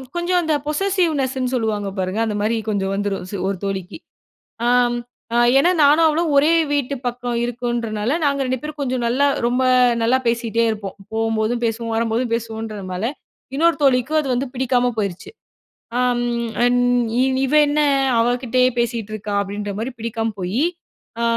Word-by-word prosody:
கொஞ்சம் 350 +1 +1
அந்த 320 -2 0
பொசசிவ்னெஸ்ன்னு 300 -7 0
சொல்லுவாங்க 215 -4 -1
பாருங்க. 185 +3 -2
அந்த 215 -2 -2
மாரி 220 +2 +1
கொஞ்சம் 195 -2 -1
வந்துரும் 200 -2 -3 0.2
ஒரு 195 - -2
தோழிக்கு. 190 - -4 0.7
ஆம், 245 0 +3 0.4
அ - - +2 0.2
ஏனா 340 +6 +4
நானும் 305 +3 +5
அவளும் 320 +1 0
ஒரே 300 +4 +5 0.2
வீட்டு 280 -1 0
பக்கம் 245 0 -2
இருக்குன்றதுனால, 240 -1 -2
நாங்க 280 -1 +1
2 255 -1 -2
பேரும் 300 -1 -7
கொஞ்சம் 255 -2 -1
நல்லா 260 +5 +2 0.2
ரொம்ப 250 +2 +1 0.4
நல்லா 240 +3 +3
பேசிகிட்டே 230 -1 0
இருப்போம். 205 -3 -5 0.2
போகும்போதும் 225 +1 0
பேசுவோம், 230 0 -3
வரும்போதும் 230 +1 0
பேசுவோம்ன்றதுனால 220 -4 -4 0.5
இன்னொரு 335 +4 +3
தோழிக்கும் 270 +2 +3
அது 285 - -4
வந்து 265 +3 -1
பிடிக்காம 250 -1 +1
போயிருச்சு. 195 -4 -3 0.7
ஆம் 245 -1 +1 0.4
அண் 245 0 +3 0.7
இவ 270 - -3
என்ன 290 +1 0 0.4
அவக்கிட்டயே 250 +1 +2
பேசிட்டிருக்கா? 215 -3 -3
அப்டின்ற 205 +1 -4
மாரி 235 +4 -3
பிடிக்காம 225 0 -2
போயி 190 +10 -1 0.6
அ - - 0
240 Hz, 140 wpm, -20 LUFS, 220-265 Hz, 0.7 s, நானும்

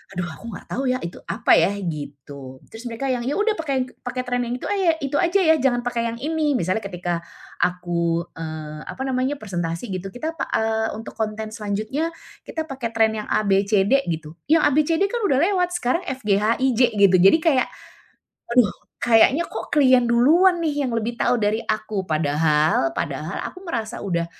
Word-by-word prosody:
"Aduh 180 - -1
aku 230 - -11
enggak - - -11
tahu 270 - -2
ya 255 - +2
itu 170 - -6
apa - - 0
ya?" - - +4 0.2
gitu. 140 -4 -7
Terus 230 +2 -8
mereka 250 +4 -3
yang, 245 -1 -2
"Iya 285 - 0
udah 425 +1 +1
pakai 275 -5 0
yang - - -7
pakai 255 +1 -4
trend 245 -1 -1
yang 245 - -2
itu - - -7
aya 375 -5 +2
itu 280 +1 0
saja 365 +2 +2
ya, - - +6
jangan 245 -3 +1
pakai 235 -1 -1
yang 230 - -4
ini." 300 +2 0
Misalnya 185 -1 0
ketika 175 -4 -3 0.4
aku, 170 -2 0 0.2
eee, 155 -1 -6
apa 265 - -7
namanya, 260 +1 0
presentasi 180 - -4
gitu, 185 0 -4
kita 315 +6 -3
pa 325 - -4
eee, 220 0 +1
untuk 220 +1 -8
konten 215 0 -3
selanjutnya, 220 +8 -2 0.4
kita 320 - -3
pakai 260 -6 -5
trend 220 -1 +2
yang 210 - -6
A-B-C-D 200 +5 +2
gitu. 160 -1 -5
Yang 320 +1 +4
A-B-C-D 310 +5 +2
kan 480 - -1
sudah 270 -7 +2
lewat. 360 -2 +2
Sekarang 335 +3 0
F-G-H-I-J 230 +1 +1 0.2
gitu 190 -2 +6
jadi 195 - +7
kayak, 280 -6 +3 0.8
aduh 235 -5 +4 0.3
kayaknya 250 +8 +5
kok - - -7
klien 260 -4 +5
duluan 325 +10 +5
nih 295 -2 0
yang - - -2
lebih 230 0 -2
tahu 245 +1 +1
dari 215 0 0
aku. 215 -3 -3
Padahal, 155 - +2
padahal - - -3 0.2
aku 365 - -12
merasa 235 - -4
udah, 170 -4 -1
230 Hz, 180 wpm, -22 LUFS, 190-270 Hz, 0.8 s, jadi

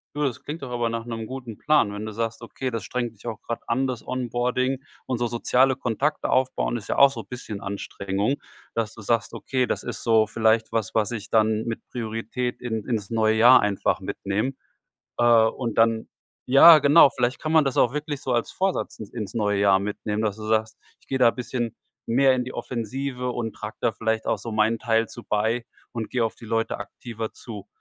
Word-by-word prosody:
Du, 150 - -1
das 130 -5 -2
klingt 150 0 -6
doch 125 - -6
aber 120 -1 0
nach 115 0 -4
'nem 115 -2 -5
guten 125 -5 -7
Plan, 145 -10 +3
wenn 105 +1 -5
du 110 - -5
sagst, 115 +1 -3
okay, 130 +2 -5
das 115 - -3
strengt 120 -2 -3
dich 110 +3 -13
auch 110 - -5
grad 115 - -5
an, 130 +3 +1
das 125 -2 -4
Onboarding. 130 +1 -1 0.2
Und 125 -2 -2
so 120 - +1
soziale 125 +3 +2
Kontakte 135 +4 -1
aufbauen 125 - +1
ist - - -10
ja - - -1
auch 140 0 +7
so 115 -4 -6
bisschen 110 -5 -7
Anstrengung. 100 +4 -2 0.4
Dass 115 -1 -2
du 110 - -10
sagst: 115 +2 0
„Okay, 130 -2 -1
das - - -2
ist - - -5
so 110 -2 +4
vielleicht 110 +1 +1
was, 115 -1 -2
was 110 0 +2
ich 110 -2 -5
dann 110 0 +2
mit 115 -1 -4
Priorität 115 +1 -3
in 110 -4 -3
ins 110 -3 -2
neue 110 -1 +2
Jahr 120 +3 +7
einfach 105 -1 0
mitnehme.“ 105 +7 -2 0.7
Äh, 120 - +3 0.2
und 115 -1 -3
dann 115 0 +3 0.4
Ja, 155 +5 +9
genau, 145 0 +7
vielleicht 125 +1 -1
kann 155 0 -2
man 160 -2 +5
das 135 - -1
auch 120 - +4
wirklich 150 -1 -4
so 130 - -1
als 120 -1 0
Vorsatz 190 0 -1
ins 105 - -8
ins 105 -4 -5
neue 105 -3 +1
Jahr 95 -1 +4
mitnehmen, 105 +1 -3
dass 105 -1 -1
du 105 - -8
sagst: 110 0 0 0.2
„Ich - - -28
gehe 135 - -1
da 120 -2 +6
bisschen 120 -2 -3 0.3
mehr 130 +3 +4
in 125 -1 -1
die 130 - -8
Offensive 125 +2 -3
und 115 -2 -3
trage 105 - -7
da - - +2
vielleicht 110 +1 -1
auch - - +1
so 115 - -6
meinen 110 +1 +2
Teil 115 -1 +1
zu 120 - -10
bei 110 +3 0 0.3
und 115 -2 -4
geh 125 - -2
auf 115 -1 0
die - - -13
Leute 115 0 -1
aktiver 110 +1 -7
zu.“ 105 -4 -9
115 Hz, 215 wpm, -24 LUFS, 110-125 Hz, 0.7 s, Ja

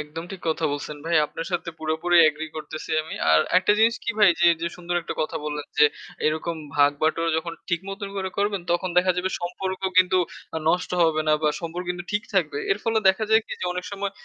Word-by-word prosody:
একদম 155 +3 -7
ঠিক 190 - -8
কথা 160 0 0
বলছেন, 145 +1 -5
ভাই, 165 0 +1
আপনার 165 - -6
সাথে 175 0 -2
পুরোপুরি 160 +3 +1
এগ্রি 155 +1 -4
করতেছি 155 0 -7
আমি। 160 - -8 0.2
আর 80 0 +6 0.2
একটা 190 +2 +3
জিনিস 230 +2 +4
কি - - 0
ভাই 210 -2 +7
যে 175 - +5 0.2
যে 170 - 0
সুন্দর 175 0 -4
একটা - - -5
কথা 155 +1 -3
বললেন, 150 -1 -4
যে, 150 - +8 0.4
এরকম 160 +2 -1 0.2
ভাগ 145 0 +6
বাটোয়ারা 165 +1 +1
যখন 170 +1 -5 0.2
ঠিকমতন 195 +3 -3
করে 190 -1 -2
করবেন 200 -2 0
তখন 175 +2 0
দেখা 185 +1 +3
যাবে 185 +1 -1
সম্পর্ক 185 +2 -4 0.2
কিন্তু 185 0 +5 0.4
আ - - 0
নষ্ট 180 +2 +1
হবে 160 -1 +2
না - - +5
বা 155 - +3
সম্পর্ক 170 +1 -5
কিন্তু 175 -1 -4
ঠিক 205 +1 0
থাকবে। 155 -6 +1
এর 195 - -3
ফলে 225 -1 +2
দেখা 190 +3 +2
যায় 220 0 +6
কি - - -7
যে - - -2
অনেক 180 0 -4
সময় 200 0 -3
175 Hz, 220 wpm, -24 LUFS, 155-190 Hz, 0.4 s, যে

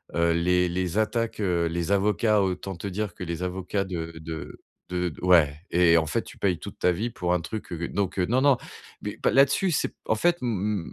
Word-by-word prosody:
heu, 85 0 +3
les 90 +1 +2
les 90 +2 -2
attaques, 115 0 0
heu, 90 -4 +1
les 85 +2 -2
avocats, 105 +1 +3
autant 95 0 -2
te 100 - -5
dire 105 +2 -3
que 90 - -7
les 85 +1 -4
avocats 95 +2 -2
de 85 -3 -5
de 80 -1 -7 0.3
de 90 -2 -1
ouais 85 -5 +5 0.2
et 85 -1 +5
en 80 - +2
fait, - - -1
tu - - -13
payes 90 -4 0
toute - - -9
ta 90 - +3
vie 110 +7 -2
pour 90 -5 -1
un 90 - +1
truc, 105 0 -6
heu 85 0 -4
donc 100 -1 -2
heu, 90 - +3
non, 120 +7 +2
non. 140 -1 +5 0.5
Mais - - -5
bah, - - +3
là-dessus, 140 +7 +4
c'est - - 0
en - - +1
fait, 175 +10 +2
m 105 -5 -1
90 Hz, 220 wpm, -26 LUFS, 85-105 Hz, 0.5 s, ouais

